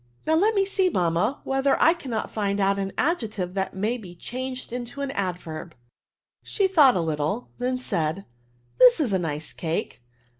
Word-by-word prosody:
'*^ - - -36
'^ - - -35 0.2
Now 315 - +2
let 415 +7 +3
me 395 -1 +3
see^. 385 -1 +2
Buoanu, 180 - +1
whether 270 0 +1
I 325 - +6
can* 340 -7 -9
not 225 - -3
find 205 -2 -1
out 200 0 +2
an 195 0 -2
adjective 215 - -1
that 190 -1 -2
may 220 +6 -1
be 180 -5 -11
changed 255 +5 -5
into 245 +3 -5
an 280 -1 -2
adverb/' 175 - -4 0.7
She 395 -3 +1
thought 300 -9 +6
a 180 - +1
little, 160 +8 -2
then 255 +1 0
said^ 160 -11 -1
^ 195 - -11 0.5
This 250 +2 +7
is 255 -10 +1
a 190 - +2
nice 155 -3 -4
cake. 165 -6 -3
220 Hz, 195 wpm, -25 LUFS, 180-270 Hz, 0.7 s, This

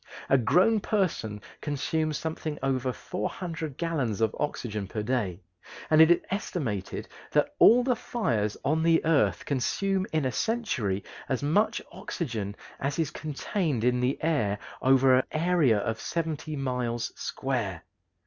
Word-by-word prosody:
A 135 - +7
grown 190 - +4
person 175 - -1 0.2
consumes 155 +1 -1
something 155 -1 -4
over 130 -1 +1
400 165 -1 -4
gallons 145 - -1
of 110 -1 +1
oxygen 110 -8 -2
per 105 +2 -4
day, 105 -7 -1 0.5
and 155 0 +7
it 160 - +8
is 175 - +5
estimated 135 - -3 0.3
that - - +2
all 245 +2 +7
the 250 -1 +2
fires 120 - -1
on 155 +3 +2
the 165 -1 +3
earth 160 -3 +2
consume 190 +8 0
in 155 -3 +1
a 130 - +1
century 120 - -1 0.3
as 130 0 -1
much 185 +10 +2
oxygen 115 - -4 0.2
as 140 0 -2
is 160 -3 0
contained 155 - -2
in 125 0 +3
the 125 +2 +1
air 125 -11 +1 0.2
over 130 0 +5
an - - +1
area 155 -8 +3
of 110 +2 -2
seventy 160 -2 -3
miles 125 -4 -2
square. 115 -10 -3
140 Hz, 140 wpm, -28 LUFS, 115-165 Hz, 0.5 s, it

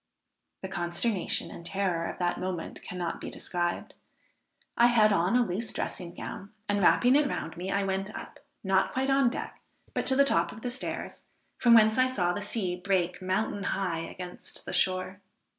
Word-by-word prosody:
The - - -2
consternation 175 +2 -1
and - - -9
terror 175 -2 -1
of - - -7
that 175 -1 0
moment 180 -3 -4
cannot 175 -2 -4
be - - -5
described; 175 -1 -3 0.8
I 240 - +6
had 215 -3 +5
on 180 +4 +2
a 245 -1 +4
loose 215 +4 -1
dressing 175 -1 -4
gown, 195 +2 -7 0.2
and 205 0 +1
wrapping 245 +7 +5
it 295 0 +4
round 165 - -4
me 180 +2 -5
I 200 0 +1
went 195 0 -1
up, - - -9 0.2
not 190 -1 +2
quite 265 +1 +1
on 270 -2 +4
deck, 250 - -6 0.3
but - - -1
to 265 - +4
the 280 +1 +5
top 170 -9 +2
of 220 - -11
the 245 - -2
stairs, 255 - -5 0.3
from 235 -1 +6
whence 220 +1 +5
I 255 - +5
saw 180 -9 0
the 205 - -3
sea 205 -3 -2
break 180 -1 0
mountain 190 +2 -1 0.2
high 180 -4 -1
against 180 +2 -8
the - - -5
shore. 185 +1 0
190 Hz, 185 wpm, -29 LUFS, 180-230 Hz, 0.8 s, I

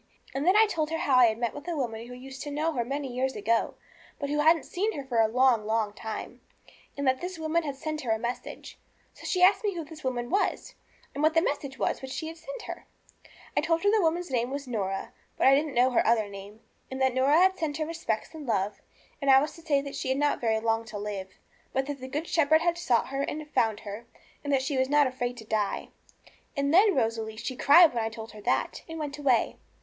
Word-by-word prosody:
And 275 +5 -2
then 370 - +5
I 440 - +7
told 320 -7 -1
her 325 - -1
how 275 -5 +2
I 250 - +8
had 220 -1 0
met 235 -1 -1
with 290 +3 -9
a 345 - -2
woman 230 -3 -3
who 250 - -9
used 265 +1 -9
to 295 - -5
know 305 +3 -1
her 240 -4 0
many 275 +1 -4
years 260 +1 -1
ago, 225 +3 0 0.4
but 280 -1 -4
who 295 - 0
hadn't 320 +2 +4
seen 420 +5 -1
her 285 - -5
for 245 -4 +1
a 220 - +4
long, 245 -1 +3
long 215 -1 0
time, 220 0 -7 0.6
and 280 - -2
that 260 0 +2
this 360 0 -5
woman 320 +1 0
had 285 -4 -4
sent 310 +2 -4
her 245 - -5
a 220 - +3
message. 235 +3 -6 0.3
So - - -10
she 365 -1 +1
asked 385 +4 +5
me 405 -3 -1
who 330 -2 -4
this 310 0 -12
woman 245 -2 -2
was, 405 - 0 0.4
and 285 - -4
what 310 +1 +3
the 325 - +5
message 280 -4 -3
was - - -1
which 265 - -7
she 315 +4 -4
had 330 - -10
sent - - -8
her. - - -8 0.7
I - - +3
told 330 +1 0
her 405 - +4
that 440 - +4
the - - +3
woman's 340 -1 0
name 245 -1 0
was 280 0 -5
Norah, 195 -5 -3 0.2
but - - +1
I 265 - +7
didn't 290 +1 +1
know 250 +2 +4
her 245 - +3
other 220 -2 +2
name, 200 +2 -11 0.3
and 265 - -5
that 260 -1 +2
Norah 300 +9 +4
sent 315 -5 -3
her 310 - -1
respects 330 -9 -3
and 305 -4 -9
her - - +3
love, 195 +2 -2 0.4
and 280 - 0
I 265 0 +8
was 295 +3 -2
to 330 - -13
say 295 -4 +1
that 280 0 -7
she 260 - -3
had 260 - +1
not 290 0 +1
very 220 -2 +1
long 225 0 0
to 215 -2 -7
live, 200 -2 -5 0.4
but 265 0 0
that 285 -1 -5
the 260 - -7
Good 295 +5 -3
Shepherd 315 -1 +3
had 340 0 +1
sought 255 -10 +1
her 275 +1 -2
and 300 +2 -4
found 220 -2 +1
her, 210 +3 -8 0.4
and 285 - -2
that 270 -1 +2
she 270 0 -1
was 260 0 +1
not 295 0 +5
afraid 245 -1 -3
to 220 - -10
die. 210 -2 -1 0.7
And 280 +1 +1
then, 395 +2 +6
Rosalie, 225 -3 -1
she 235 +3 -4
cried 310 +5 +7
when 230 -2 -1
I 220 - -1
told 225 0 -9
her 215 - -11
that, - - -1
and 325 - -6
went 295 -2 -5
away. 260 -5 +2
270 Hz, 255 wpm, -28 LUFS, 230-315 Hz, 0.7 s, I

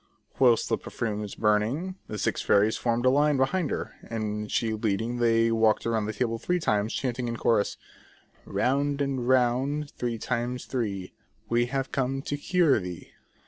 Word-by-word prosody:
Whilst 120 -4 +4
the - - 0
perfume 105 -3 -3
was 105 -2 -6
burning, 110 - +1
the 105 - -5
six - - -1
fairies 105 +2 +3
formed 120 0 0
in 130 - +5
line 145 0 +3
behind 150 +5 +1
her, - - -4
and 105 -2 -4
she 110 -2 0
leading, 110 +2 -1
they 115 -1 +3
walked 110 -1 +2
round 110 -2 0
the 110 - -3
table 115 -1 -1
three 180 +7 0
times, 105 -7 0
chanting 125 -2 -2
in 115 0 -3
chorus: 110 -3 +1 0.7
''''Round 140 +2 0
and 135 -3 -1
round 130 +4 +2
three 120 -2 -3
times 125 +2 -2
three, 100 -7 -3 0.4
We 120 +1 +2
have 135 +1 -2
come 135 0 -1
to 145 - -2
cure 160 -2 +3
thee." 90 -3 -8
120 Hz, 170 wpm, -27 LUFS, 110-135 Hz, 0.7 s, in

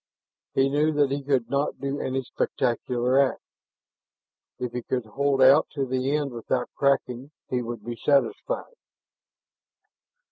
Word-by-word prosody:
He 135 0 +4
knew 150 +3 +2
that 145 -2 +2
he 140 +1 -1
could 135 -4 0
not 140 +1 -1
do 140 +1 -3
any 130 0 -2
spectacular 125 +1 0
act; 135 -4 +1 1.1
if 125 -1 -4
he 125 - -3
could 125 0 -2
hold 135 +4 +1
out 135 +4 +7
to 140 -2 0
the 130 +2 0
end 145 -2 -1
without 125 +1 -2
cracking 135 -1 0 0.2
he 125 -1 +1
would 115 -2 -6
be 120 0 -4
satisfied. 145 - 0
135 Hz, 140 wpm, -25 LUFS, 125-140 Hz, 1.1 s, out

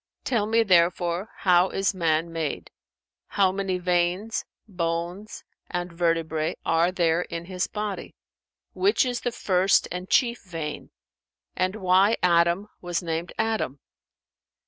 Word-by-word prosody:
Tell 220 -5 0
me, 225 +1 +3
therefore, 175 0 +2
how 180 0 +4
is 195 +1 0
man 165 -2 0
made; 160 -3 -4 0.6
how 195 -2 +2
many 190 -1 -2
veins, 180 +4 0 0.2
bones 175 +2 -4 0.3
and 175 0 -4
vertebrae 165 -2 0
are 165 +2 +3
there 170 -2 +2
in 170 -1 -6
his 180 0 -2
body; 210 -2 -5 0.6
which 390 -6 +2
is 245 -1 -2
the 245 - -1
first 190 -3 +2
and 180 +1 -5
chief 240 -3 +2
vein 165 -5 -6 0.7
and 185 +2 0
why 195 +2 +3
Adam 170 +3 +3
was 175 -1 -2
named 165 +1 -3
Adam?" 220 -11 -1
180 Hz, 125 wpm, -25 LUFS, 170-200 Hz, 0.7 s, how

